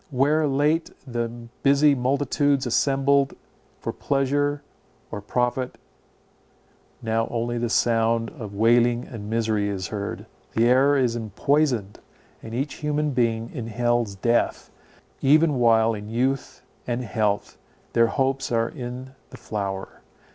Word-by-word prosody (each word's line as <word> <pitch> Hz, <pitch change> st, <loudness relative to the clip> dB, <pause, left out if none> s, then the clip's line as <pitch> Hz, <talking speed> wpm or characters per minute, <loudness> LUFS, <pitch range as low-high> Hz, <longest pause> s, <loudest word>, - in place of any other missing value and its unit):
Where 150 Hz, +3 st, +2 dB
late 150 Hz, +4 st, +1 dB, 0.2 s
the 120 Hz, -3 st, -2 dB, 0.3 s
busy 140 Hz, +1 st, +5 dB
multitudes 140 Hz, +1 st, +1 dB
assembled 135 Hz, +2 st, +2 dB, 0.5 s
for -, -, -3 dB
pleasure 145 Hz, +1 st, 0 dB, 0.5 s
or 105 Hz, -, -5 dB
profit, 125 Hz, +4 st, -1 dB, 1.3 s
now 115 Hz, 0 st, 0 dB
only 120 Hz, 0 st, -2 dB
the 120 Hz, 0 st, -1 dB
sound 115 Hz, 0 st, +2 dB
of 110 Hz, -10 st, -8 dB
wailing 120 Hz, +2 st, +3 dB
and 105 Hz, -4 st, -8 dB
misery 110 Hz, -2 st, 0 dB
is 95 Hz, -3 st, -4 dB
heard. 100 Hz, -2 st, -5 dB, 0.3 s
The 115 Hz, -, +3 dB
air 135 Hz, +3 st, +4 dB
is 125 Hz, -3 st, +1 dB
empoisoned, 120 Hz, 0 st, 0 dB, 0.4 s
and 115 Hz, 0 st, -7 dB
each 135 Hz, +4 st, -3 dB
human 150 Hz, 0 st, 0 dB
being 115 Hz, -3 st, 0 dB
inhales 120 Hz, -3 st, -1 dB
death, 115 Hz, +5 st, 0 dB, 0.5 s
even 150 Hz, 0 st, +4 dB
while 115 Hz, -1 st, +4 dB
in 105 Hz, 0 st, -7 dB
youth 125 Hz, +2 st, -1 dB, 0.2 s
and 120 Hz, +1 st, -1 dB
health, 105 Hz, -2 st, -1 dB, 0.4 s
their 115 Hz, 0 st, +4 dB
hopes 135 Hz, +1 st, -1 dB
are 115 Hz, -1 st, +1 dB
in 125 Hz, -1 st, -7 dB, 0.2 s
the -, -, -11 dB
flower. 100 Hz, -2 st, -5 dB
120 Hz, 125 wpm, -24 LUFS, 115-140 Hz, 1.3 s, busy